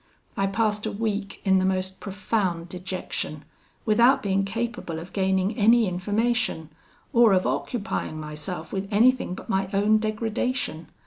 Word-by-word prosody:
I 195 - +1
passed 210 +1 0
a - - -2
week 205 -1 -3
in 190 -1 +4
the - - +1
most 190 0 -1
profound 190 -4 -2
dejection, 180 -4 -5 0.4
without 235 +5 +4
being 195 -1 +1
capable 225 -3 -3
of 170 +3 -9
gaining 190 +1 +1
any 225 +1 +5
information, 205 -1 -1 0.4
or 235 -3 +6
of 185 -1 +2
occupying 200 -8 -2
myself 155 +3 -6
with 195 0 -2
anything 235 -2 +3
but - - -10
my 190 0 0
own 210 +2 +4
degradation. 220 -4 -2
200 Hz, 140 wpm, -25 LUFS, 185-225 Hz, 0.4 s, or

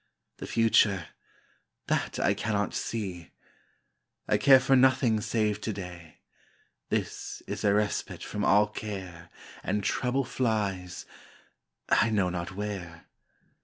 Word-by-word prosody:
The - - -7
future 105 -5 +3 0.8
that - - -1
I - - +3
cannot 105 -2 -1
see! 95 -7 -4 1.0
I 105 - +3
care 135 +4 +8
for 135 +1 +3
nothing 130 -4 +4
save 105 -2 0
to 110 - -2
day 90 -4 -9 0.7
This - - -3
is - - -5
a 100 - +4
respite 105 0 -1
from 105 -1 -4
all 105 +1 +5
care, 95 -6 -7 0.3
And 105 0 -1
trouble 130 +6 0
flies 105 -8 -2 0.8
I - - +4
know 100 -4 +1
not 90 +1 -5
where. 95 -5 -6
105 Hz, 120 wpm, -28 LUFS, 90-110 Hz, 1.0 s, care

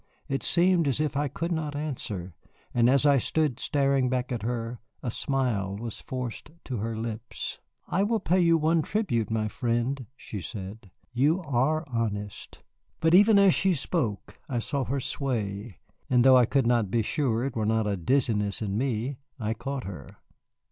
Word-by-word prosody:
It 135 - -1
seemed 175 -2 +3
as 135 0 0
if 150 -3 0
I 145 +1 +1
could 165 +5 -3
not 155 -3 -2
answer, 110 - -4 0.4
and 120 0 +4
as 140 +2 +4
I 140 -2 +5
stood 145 -1 0
staring 140 -3 +2
back 125 0 -1
at 120 - -2
her 115 +1 -3 0.2
a 120 - -2
smile 115 -8 -1
was 115 0 -6
forced 125 0 -5
to 125 - -4
her 110 +1 -3
lips. 115 +1 -5 0.3
"I 190 - +1
will 220 +2 +2
pay 185 0 +2
you 170 -2 +5
one 160 +1 +2
tribute, 150 - -1
my 110 -1 0
friend," 120 +3 -1
she 105 -6 -7
said; 100 +2 -7 0.2
"you 145 +8 +3
are 145 +3 +1
honest." 105 -5 -4 0.4
But 160 +1 +3
even 205 +3 +7
as 200 -3 +6
she 190 -2 +2
spoke 120 - -2
I 125 - -1
saw 135 +3 -1
her 135 +3 -1
sway, 110 - -3 0.3
and 125 -2 +4
though 130 0 +8
I 125 -2 +6
could 135 -1 +2
not 115 -4 +2
be 115 +2 +1
sure 120 -1 0
it 135 - -4
were 110 -2 0
not 110 0 +2
a 105 -1 0
dizziness 105 0 +1
in 105 -1 -2
me, 125 +1 -2 0.2
I 110 -1 -1
caught 135 +3 -4
her. 90 -8 -9
125 Hz, 180 wpm, -27 LUFS, 110-145 Hz, 0.4 s, though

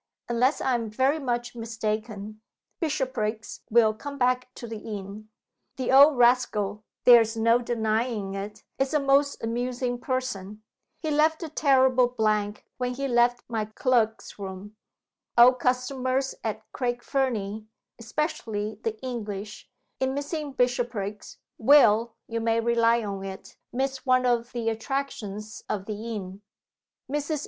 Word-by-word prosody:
Unless 245 +4 +1
I 260 - +1
am 230 -2 -1
very 265 +8 +1
much 240 -3 -2
mistaken, 215 -2 -4 0.4
Bishopriggs 245 - -2
will 220 -1 +5
come 280 +6 -7
back 255 0 +1
to - - -8
the 225 -1 -6
inn. 210 0 -7 0.5
The 255 -1 -1
old 280 +1 +8
rascal 215 -4 +2 0.2
(there 240 -2 +9
is 225 0 -2
no 230 +2 +4
denying 220 -3 -1
it) 200 +1 -6 0.2
is 270 +3 0
a - - +4
most 280 0 +2
amusing 245 +1 -2
person. 215 -6 -4 0.3
He 315 - -3
left 315 +3 +2
a 325 - -5
terrible 260 -4 +4
blank 215 -3 -1
when 250 0 -2
he 275 +1 -2
left 240 -1 +2
my 225 -2 -2
clerks' 225 -1 0
room. 195 +2 -7 0.6
Old 250 +1 +7
customers 255 +1 0
at 220 -1 -3
Craig 240 -2 -2
Fernie 220 -6 -1 0.3
(especially 220 -5 -3
the 220 -1 -3
English), 210 -5 -6 0.3
in 265 0 0
missing 290 0 -4
Bishopriggs, 240 -5 -2 0.2
will, 230 -3 +5
you 230 0 -2
may 225 0 +2
rely 230 0 +3
on 200 -2 -4
it, 195 0 -8 0.2
miss 265 +1 -2
one 255 -1 +3
of 240 -1 +1
the 235 -2 -3
attractions 220 -3 -4
of 195 -2 -2
the 220 +2 -5
inn. 190 -1 -7 0.7
Mrs. 295 +2 -2
235 Hz, 140 wpm, -26 LUFS, 215-260 Hz, 0.7 s, there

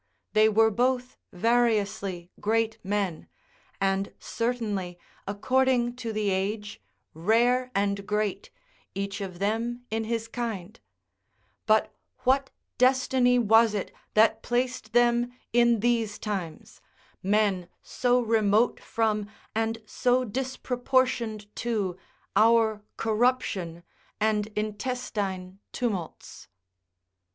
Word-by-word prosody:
They 215 0 +5
were 220 +1 +4
both 250 +2 0 0.2
variously 205 -4 0
great 225 +1 0
men, 195 -4 -2 0.5
and 195 0 0
certainly, 215 -7 -2 0.3
according 245 +3 +1
to 235 -3 -4
the 210 -2 0
age, 205 +2 -2 0.3
rare 240 +9 +2
and 200 0 0
great, 210 -2 -1 0.5
each 200 0 -3
of 185 -3 -5
them 230 +5 -2
in 225 0 -1
his 225 0 -2
kind: 225 -4 -5 0.9
but 215 0 +3 0.3
what 270 +1 +2 0.3
destiny 255 -1 +4
was 225 -1 +5
it 200 - -3 0.2
that 220 +1 +4
placed 245 -2 -2
them 240 0 +3 0.2
in 235 -2 +4
these 230 -3 +1
times, 190 -7 -5 0.4
men 195 -3 +1
so 245 0 +1
remote 220 0 +2
from 215 -2 -1 0.2
and 225 0 -1
so 250 +3 +1
disproportioned 250 -2 -1
to 210 -6 -1 0.4
our 220 -1 +4 0.2
corruption 215 -7 0 0.4
and 215 -1 +1
intestine 210 -4 -3
tumults? 200 -9 -4
220 Hz, 100 wpm, -27 LUFS, 200-240 Hz, 0.9 s, They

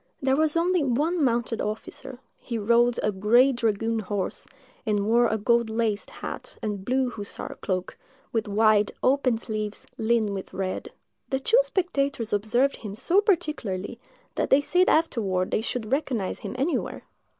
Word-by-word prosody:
There 265 -1 +2
was 310 +2 +2
only 350 -1 +2
one 300 +6 +1
mounted 235 -2 0
officer: 220 +4 -5 0.2
he 235 - -4
rode 235 +2 +3
a 210 - +2
gray 225 +7 +4
dragoon 225 -2 0
horse, 205 -2 -3 0.4
and 205 -3 0
wore 235 +2 +4
a 220 - 0
gold 235 +2 +2
laced 220 -2 -1
hat - - -7
and 205 -3 -3
blue 255 +2 +1
hussar 205 -3 -6
cloak, 185 -1 -2 0.4
with 225 -2 0
wide, 210 0 +3
open 255 -3 +3
sleeves, 215 -2 -4
lined 225 -2 +2
with 195 -1 -6
red. 190 -1 -3 0.4
The 265 - 0
two 455 - +4
spectators 280 - -1
observed 240 +7 +2
him 205 -3 -7
so 355 - +3
particularly, 275 - -1 0.3
that - - -1
they 270 - +6
said 360 +6 +3
afterward 205 - +1
they - - +1
should 225 0 -4
recognise 260 -9 -1
him - - -6
anywhere. 280 +6 -1
235 Hz, 155 wpm, -26 LUFS, 210-275 Hz, 0.4 s, they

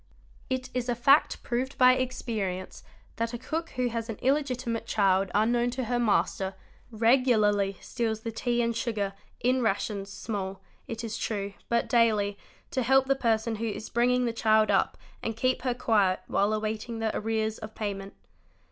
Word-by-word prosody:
It 260 0 -2
is 250 0 -2
a 240 - +1
fact 275 +5 +4
proved 255 +3 -2
by 255 0 +7
experience 220 -8 -3 0.4
that 230 +1 -1
a - - -3
cook 320 +7 -4
who 250 -1 +1
has 230 0 -4
an 225 - -3
illegiti 265 +1 0
mate 230 -1 -2
child 195 -2 +2
unknown 235 +3 +3
to 260 - 0
her 240 +1 0
master, 195 -4 +1 0.3
regularly 220 -4 +3
steals 225 -3 -2
the 230 - -4
tea 240 +1 0
and 230 0 0
sugar, 215 -4 -1 0.3
in 255 +1 +2
rations, 200 -2 -1
small, 195 -3 -4 0.3
it 230 0 -5
is 225 -1 -4
true, 200 -2 -2 0.2
but 235 0 +1
daily, 215 -4 +3 0.4
to 260 - 0
help 265 +2 +4
the 275 +1 +2
person 225 -3 0
who 230 +2 -2
is 215 +1 -5
bringing;; 250 +1 +2
the 235 - -1
child 220 -1 +3
up - - +2 0.2
and 225 -1 -3
keep 255 +2 +1
her 250 -1 -1
quiet 205 -6 +2
while 205 +2 +1
awaiting 215 +2 -2
the 225 -1 -1
arrears 220 0 -1
of 220 0 -9
payment. 200 -2 -4
230 Hz, 175 wpm, -28 LUFS, 210-245 Hz, 0.4 s, by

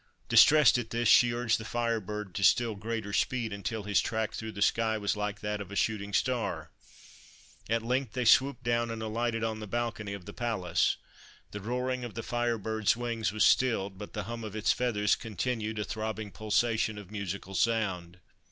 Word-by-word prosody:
Distressed 150 -5 +7
at 115 -2 -5
this, 120 0 0
she 120 -1 +6
urged 120 -1 +1
the - - -6
Fire 115 0 -1
Bird 105 -1 -6
to 100 - -3
still 115 +3 +4
greater 110 0 -4
speed, 115 0 0
until 105 +2 -4
his 100 -1 +2
track 110 -1 -2
through 110 -1 -6
the - - -8
sky 110 0 +2
was 105 0 -1
like 105 0 -3
that 105 0 -3
of 100 -1 -8
a - - -6
shooting 100 -1 -1
star. 125 +3 -1 1.0
At 115 0 +1
length 125 -1 -1
they 125 -1 -1
swooped 130 +3 +4
down 120 0 +1
and 115 -1 -4
alighted 115 +1 -1
on 110 -1 -2
the 105 - -7
balcony 110 -2 -3
of 100 -3 -8
the - - -9
palace. 110 -8 0 0.5
The 105 - -6
roaring 125 +3 -2
of 120 - -7
the 115 - -4
Fire 120 -1 0
Bird's 110 +1 0
wings 115 -3 -2
was 110 +1 +3
stilled, 100 -7 +2
but 105 - -8
the 105 - -3
hum 115 +3 -6
of 110 -1 -6
its 110 0 +2
feathers 105 -5 +1
continued 110 0 -3
a 105 - -1
throbbing 110 0 -4
pulsation 110 0 0
of 100 -2 -10
musical 100 -2 -5
sound. 95 -6 0
110 Hz, 195 wpm, -30 LUFS, 105-120 Hz, 1.0 s, Distressed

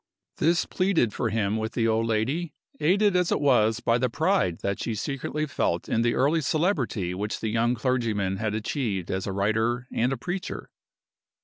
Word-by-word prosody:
This 165 +2 +2
pleaded 185 - +1
for 120 - -1
him 105 -1 0
with 110 +1 -3
the 115 -1 +1
old 115 0 +1
lady, 135 +9 -1 0.2
aided 195 +6 +3
as 180 -1 +2
it - - +2
was 115 -6 +3
by 115 +1 +2
the 125 +1 +1
pride 160 - +1
that 100 0 -2
she 115 - -2
secretly 140 +6 -3
felt 85 - -1
in 115 - +1
the 120 0 +1
early 150 +5 +2
celebrity 135 - 0
which 105 +3 -3
the 110 - -2
young 115 +2 +1
clergyman 115 -6 0
had 110 0 -2
achieved 110 - -2
as 95 +1 -2
a - - -1
writer 110 +5 0
and 120 +3 +1
a 135 - -1
preacher. 180 - -5
115 Hz, 185 wpm, -26 LUFS, 110-150 Hz, 0.2 s, aided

